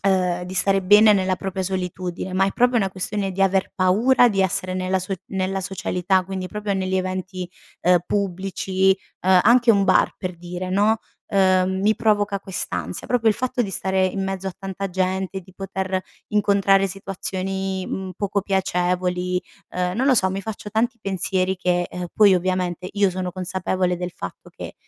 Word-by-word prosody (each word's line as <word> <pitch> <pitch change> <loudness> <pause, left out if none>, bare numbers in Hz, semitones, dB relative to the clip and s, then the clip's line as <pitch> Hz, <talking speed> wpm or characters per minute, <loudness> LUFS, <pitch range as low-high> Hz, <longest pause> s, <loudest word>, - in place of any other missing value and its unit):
ehm, 180 -2 +2
di 185 +1 -7
stare 195 +1 +2
bene 210 +3 +7
nella 185 -1 +1
propria 190 0 -4
solitudine, 185 -1 -4
ma 190 - +3
è 195 - -2
proprio 245 0 +3
una 195 -4 +1
questione 195 +1 -2
di 195 - -5
aver 190 0 +1
paura 225 +7 +4
di 195 -3 0
essere 185 0 -1
nella 185 0 0
so 185 +2 -3
nella 190 0 -2
socialità 185 0 0
quindi, 190 -1 -4
proprio 210 -1 -3
negli 190 0 -1
eventi, 185 -1 -3 0.3
uhm, 180 0 +5
pubblici, 190 -1 0 0.3
uhm, 185 0 +5
anche 240 +1 +5
un 200 -1 +3
bar 185 - +3
per 180 -2 -5
dire 180 +1 -6
no, 210 +4 +3 0.3
uhm, 190 -1 +2
mi 215 +2 +4
provoca 205 -2 +1
quest'ansia, 190 -2 -4
proprio 235 -3 +2
il 210 - +3
fatto 255 -1 -1
di 200 - -4
stare 190 0 0
in 195 +1 -3
mezzo 195 0 -4
a - - -6
tanta 195 0 -4
gente, 190 +1 -1
di 185 +1 -18
poter 190 -1 -3 0.3
incontrare 200 -1 +3
situazioni, 190 0 -4
mhmm, 190 -1 -4
poco 200 -1 -1
piacevoli, 180 -1 0 0.3
uhm, 180 0 -1
non 260 +3 +1
lo 265 - +5
so, 190 -5 +3
mi 195 +1 -3
faccio 210 -1 -6
tanti 235 +3 0
pensieri 190 -1 -1
che, 180 -1 0
uhm 180 0 -5
poi 205 -3 +6
ovviamente, 185 0 -1
io 200 -1 +3
sono 180 0 -4
consapevole 185 0 -1
del 180 0 -4
fatto 90 - -9
che, - - -9
190 Hz, 175 wpm, -22 LUFS, 185-195 Hz, 0.3 s, bene